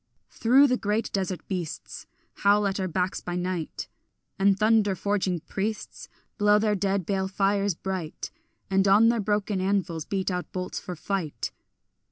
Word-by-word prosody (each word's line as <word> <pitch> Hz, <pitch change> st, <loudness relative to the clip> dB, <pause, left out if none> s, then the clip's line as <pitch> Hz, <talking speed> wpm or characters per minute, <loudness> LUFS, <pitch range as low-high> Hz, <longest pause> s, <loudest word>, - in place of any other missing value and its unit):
Through 260 Hz, +5 st, +5 dB
the 255 Hz, -2 st, +2 dB
great 210 Hz, +1 st, -1 dB
desert 190 Hz, -2 st, -2 dB
beasts 180 Hz, -5 st, -5 dB, 0.3 s
Howl 205 Hz, +1 st, +4 dB
at 195 Hz, 0 st, -1 dB
our 190 Hz, -, 0 dB
backs 180 Hz, +1 st, -1 dB
by 175 Hz, -, -4 dB
night, 180 Hz, -2 st, -3 dB, 0.5 s
And 195 Hz, 0 st, +4 dB
thunder 215 Hz, -2 st, +3 dB
forging 190 Hz, -3 st, -1 dB
priests 210 Hz, +6 st, -4 dB, 0.3 s
Blow 210 Hz, 0 st, +5 dB
their 210 Hz, 0 st, +2 dB
dead 195 Hz, -2 st, 0 dB
bale 190 Hz, 0 st, 0 dB
fires 195 Hz, 0 st, +1 dB
bright, 185 Hz, -3 st, -5 dB, 0.4 s
And 195 Hz, 0 st, +2 dB
on 210 Hz, +4 st, +6 dB
their 235 Hz, -1 st, +1 dB
broken 205 Hz, -1 st, 0 dB
anvils 185 Hz, -5 st, 0 dB
beat 195 Hz, -1 st, -1 dB
out 180 Hz, 0 st, -4 dB
bolts 180 Hz, -1 st, -4 dB
for 180 Hz, -, -6 dB
fight. 175 Hz, -2 st, -3 dB
195 Hz, 155 wpm, -26 LUFS, 185-205 Hz, 0.5 s, on